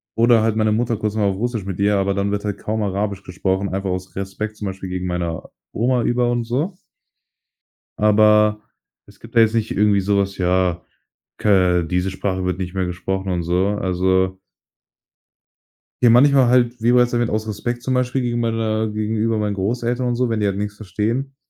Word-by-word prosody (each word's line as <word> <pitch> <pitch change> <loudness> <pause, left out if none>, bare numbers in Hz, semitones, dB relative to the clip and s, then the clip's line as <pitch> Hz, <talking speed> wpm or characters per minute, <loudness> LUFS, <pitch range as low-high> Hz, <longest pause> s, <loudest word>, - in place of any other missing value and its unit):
oder 115 0 +4
halt 110 0 0
meine 110 -1 +2
Mutter 115 0 0
kurz 105 0 -3
mal 110 - 0
auf 95 - -3
Russisch 115 -2 -2
mit 95 -1 -6
ihr, 100 0 +3
aber 100 0 +1
dann 100 +1 -1
wird 100 0 -2
halt 105 -2 -3
kaum 110 +1 -3
Arabisch 100 0 -2
gesprochen, 95 +2 -2
einfach 95 +1 -3
aus 90 0 -4
Respekt 100 +3 -5
zum 105 - -6
Beispiel 95 0 -6
gegen 90 0 -3
meiner 85 -2 -3 0.2
Oma 120 +2 +1
über 120 +1 +1
und 120 -1 0
so. 145 - -2 1.2
Aber, 105 0 +4 0.5
es - - -20
gibt 115 +1 -14
da - - +7
jetzt 110 0 +4
nicht 115 -1 0
irgendwie 105 -1 +2
so 100 +1 +1
was, 100 0 -1
ja, 90 -1 +1 0.6
ke 90 -4 +3
diese 90 +3 -1
Sprache 95 -1 -3
wird 90 0 -2
nicht 90 0 -5
mehr 95 -1 -1
gesprochen 95 +2 -3
und 90 -1 -1
so, 90 +3 +1
also 95 0 +1 1.6
ja 120 - +6
manchmal 130 +1 +5
halt, 120 -1 +2
wie 120 - +3
bereits 125 0 +4
erwähnt 120 0 0
aus 110 +1 -2
Respekt 120 +3 -3
zum 130 - 0
Beispiel 125 +1 0
gegenüber 120 -1 -1
meiner 110 -1 -1
gegenüber 110 +1 -1
meinen 105 -1 -1
Großeltern 120 +5 -1
und 120 - -1
so, 125 0 +1
wenn 115 -2 -1
die 105 - +1
halt 100 0 -1
nix 105 0 -3
verstehen. 110 +7 -3
105 Hz, 195 wpm, -20 LUFS, 95-115 Hz, 1.6 s, da